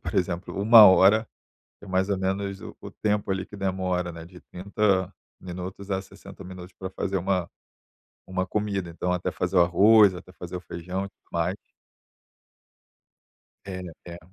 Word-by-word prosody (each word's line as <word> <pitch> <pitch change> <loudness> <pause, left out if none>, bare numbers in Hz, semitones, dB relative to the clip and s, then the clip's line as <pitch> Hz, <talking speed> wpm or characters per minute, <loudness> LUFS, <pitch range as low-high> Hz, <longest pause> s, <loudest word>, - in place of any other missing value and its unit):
por - - -6
exemplo, 90 0 -2
1 110 0 +9
hora, 100 +4 +5 0.5
que - - -12
é - - -13
mais 95 +1 +1
ou 100 - +1
menos 95 +1 -2
o - - -9
o - - -8
tempo, 105 -2 -1
ali, 95 0 -2
que 105 - -12
demora, 90 -2 -2
né, 80 0 -9
de 90 +1 -14
30 95 0 0 0.3
minutos 95 +2 -7
a 95 - 0
60 95 - -13
minutos 90 0 -10
pra 95 - -5
fazer 95 +1 -3
uma 95 -1 -1 0.8
uma 95 0 -2
comida, 100 -2 -2
então 90 +2 -3
até 90 0 -1
fazer 90 +1 -1
o - - +7
arroz, 100 +4 +6
até 90 +1 -11
fazer 90 -1 -8
o 90 - -5
feijão, 90 +3 -5 0.2
mais. 85 +3 0 2.1
É, 95 -1 -5 0.2
é. 85 0 -9
95 Hz, 165 wpm, -26 LUFS, 90-100 Hz, 2.1 s, 1